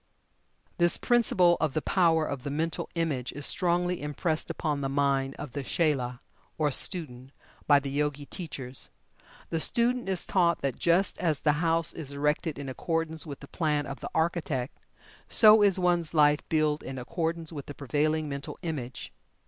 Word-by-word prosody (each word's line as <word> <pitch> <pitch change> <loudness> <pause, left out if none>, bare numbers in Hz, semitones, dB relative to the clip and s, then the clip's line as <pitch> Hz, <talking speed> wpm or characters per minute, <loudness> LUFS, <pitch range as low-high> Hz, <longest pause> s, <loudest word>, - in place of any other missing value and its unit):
This 175 -1 +5
principle 185 -8 +3
of 155 -4 0
the 155 - +1
power 165 -4 +3
of 140 -3 -4
the 140 - -5
Mental 160 +3 -2
Image 150 -7 -1
is 145 +1 -5
strongly 180 0 +1
impressed 155 +2 -2
upon 150 -2 -2
the 135 - -2
mind 135 -1 0
of 145 - -7
the 140 - -4
chela, 130 -4 -1 0.4
or 150 -2 +1
student, 135 -6 0 0.4
by 145 -1 +6
the 140 -1 -5
Yogi 145 0 -1
teachers. 135 -7 -6 0.6
The 165 - 0
student 240 +4 +2
is 185 -2 -1
taught 170 -5 +1
that 135 -3 -2
just 175 +3 +2
as 160 -5 0
the 150 - +3
house 165 -1 +1
is 145 -3 -6
erected 150 +2 -1
in 140 -1 -6
accordance 160 +3 -2
with 140 -2 -8
the 140 - -10
plan 150 -3 -1
of 140 - -7
the - - -6
architect, 160 -5 -1 0.5
so 215 -1 +7
is 200 -2 +4
one's 175 -3 0
life 150 -1 +5
built 155 -1 +1
in 135 - -7
accordance 165 +5 -3
with 145 -4 -7
the 145 - -8
prevailing 155 +3 0
Mental 140 0 -6
Image. 140 -7 -5
155 Hz, 170 wpm, -28 LUFS, 140-170 Hz, 0.6 s, so